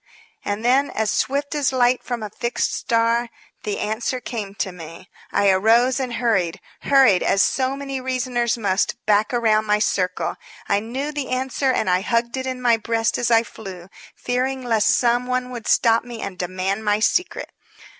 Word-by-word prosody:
And 205 +3 -3
then, 270 +3 +3
as 220 -1 -1
swift 285 +2 -1
as 290 -3 +1
light 250 -1 +2
from 240 -3 -4
a 210 - -6
fixed 235 +3 -2
star, 230 +1 +1 0.3
the 210 - -3
answer 225 +4 -2
came 215 -5 -6
to 195 - -2
me. 165 0 -11 0.2
I 200 -1 +3
arose 230 +7 +3
and 255 -2 -3
hurried 195 -9 0 0.2
hurried 270 -9 +5
as 195 - +3
so 260 0 0
many 275 -1 -5
reasoners 250 -2 -1
must, 200 -2 0
back 210 0 +2
around 220 -3 +2
my 210 0 +2
circle. 185 -3 -1 0.3
I 200 - +2
knew 260 +7 -4
the 290 -3 -4
answer 260 +1 0
and 230 - 0
I 180 0 +2
hugged 235 +3 0
it 260 0 -4
in 255 -1 -4
my 235 -2 +4
breast 225 0 -1
as 240 - 0
I 230 -1 +5
flew, 190 -6 -10 0.3
fearing 255 +1 -2
lest 225 -3 +2
some 245 0 +2
one 255 0 -2
would 240 -3 -7
stop 230 0 +3
me 240 -1 -9
and 195 - -5
demand 185 +3 -3
my 210 0 +1
secret. 350 +11 0
235 Hz, 180 wpm, -22 LUFS, 210-255 Hz, 0.3 s, hurried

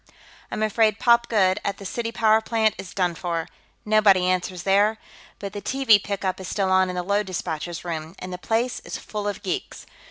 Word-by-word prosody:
I'm 215 - -2
afraid 215 0 +2
Pop 235 0 +3
Goode, 190 -3 +3
at 200 - -2
the 200 - -10
city 230 +4 -3
power 220 -1 +3
plant, 220 -1 +1
is 185 - -7
done 180 -3 0
for; 170 -1 -3 0.4
nobody 210 -4 +4
answers 180 -1 -1
there, 205 +3 +3 0.4
but 200 0 -7
the 205 - -5
TV 240 -6 +3
pickup 195 -2 -2
is 190 - -7
still 195 0 0
on 185 0 +4
in 180 - -4
the 180 - -2
load 200 +2 0
dispatcher's 175 -1 -4
room, 160 0 -5
and 185 0 -7
the 180 - -6
place 230 +5 -1
is - - -7
full 210 -1 -5
of 205 - -4
geeks. 375 +1 -4
200 Hz, 200 wpm, -24 LUFS, 185-215 Hz, 0.4 s, nobody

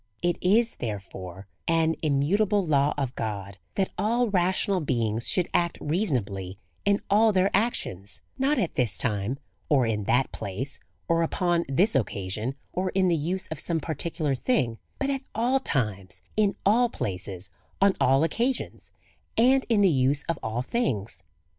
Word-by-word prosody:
It 175 0 0
iSj 225 +5 +3
therefore^ 95 -4 -6 0.2
an 165 -1 +3
immutable 185 +8 +2
law 145 -2 +3
of 135 -3 -2
God^ 100 -3 -4 0.2
that 190 -1 0
all 235 +4 +2
rational 190 +1 +1
beings 115 -5 0
should 180 -2 +2
act 170 -2 +1
reasonably 115 - -2 0.3
in 200 0 +2
all 215 +2 +5
their 190 0 +2
ac 225 +5 +3
tions; 100 +2 -5
not 270 +3 +1
at 190 -9 0
this 120 -6 +1
time^ 110 +2 -1 0.3
or 135 -5 +4
in 105 -3 -1
that 130 +5 +2
place^, 110 +9 -2 0.3
or 165 0 +2
upon 170 +1 +1
this 185 +11 +3
occasion, 105 +1 -1 0.2
or 185 +1 0
in 190 -1 +3
the 170 - +3
use 180 +5 -2
of 160 - -5
some 165 -2 0
particular 160 -1 -2
thing, 125 - 0 0.2
but 275 0 0
at 270 -1 -2
all 245 +4 +2
times, 100 - -2
in 205 -2 +2
ail 235 +4 +4
places, 95 - -4 0.3
on 195 0 +4
all 135 +3 +4
occasions, 240 +10 -1 0.5
and 260 +4 +4
in 220 -3 +4
the 200 - +6
use 140 -2 +2
of 165 -2 -3
all 110 +3 -2
things. 115 - -2
160 Hz, 160 wpm, -26 LUFS, -, 0.5 s, the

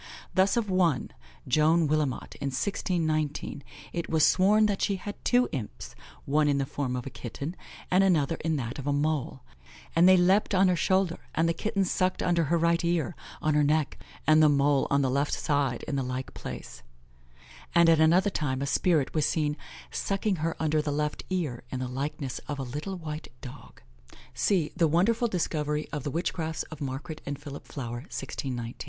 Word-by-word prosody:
Thus 190 +3 +3
of 230 -3 +1
one, 180 -7 +1 0.4
Joane 160 +1 +4
Willimot, 150 -3 -1
in 140 - -1
1619, 155 -2 -1 0.3
it 170 -1 -3
was 160 -1 +4
sworn 210 +3 +4
that 205 -2 0
she 200 - +1
had 205 +2 -6
two 245 0 +3
imps, 105 - -6 0.3
one 150 +2 +2
in 145 -1 +2
the 135 - 0
form 130 -2 -3
of 125 - -4
a 135 - -6
kitten, 140 +8 -6 0.4
and 185 +2 +5
another 165 -4 +2
in 160 0 -1
that 130 -1 -4
of 140 - -6
a 145 - +2
mole, 145 - -1 0.5
"and 170 +3 +6
they 185 - +7
leapt 190 +3 +3
on 190 0 +5
her 180 - +3
shoulder, 185 0 +1 0.2
and 165 +1 +2
the 165 - +2
kitten 195 +1 -1
sucked 185 +1 0
under 170 -2 +2
her 170 +4 +2
right 170 +1 +2
ear, 170 0 0 0.3
on 155 - +2
her 150 - +4
neck, 150 0 +1 0.3
and 155 +1 +6
the 155 - +6
mole 140 -1 +3
on 140 0 +3
the 130 - +1
left 140 +2 0
side, 140 -5 0
in 140 - -1
the - - +1
like 130 +1 -4
place;" - - -8 0.9
and 170 0 +6
at 165 -1 +5
another 175 +6 +4
time 135 -6 -1
a - - -1
spirit 155 0 +1
was 155 -1 +2
seen 150 -2 0 0.4
"sucking 195 0 -1
her 165 +1 -1
under 155 -1 +1
the 150 -1 -2
left 150 +1 -2
ear, 160 -10 -2
in 130 - -4
the 130 - -2
likeness 135 +1 -4
of 145 - -3
a 135 - -3
little 150 +10 -5
white 155 -2 -6 0.2
dogge." 125 -1 -11 0.5
(See 165 +4 +1
The 165 - +3
Wonderful 220 - +2
Discovery 155 -6 -1
of 150 -3 -3
the 145 - -3
Witchcrafts 160 0 -2
of 155 - -8
Margare 145 +3 -5
and 145 0 -4
Philip 145 -1 -9
Flower, 120 -4 -5
1619). 125 -3 -4
155 Hz, 190 wpm, -28 LUFS, 140-175 Hz, 0.9 s, they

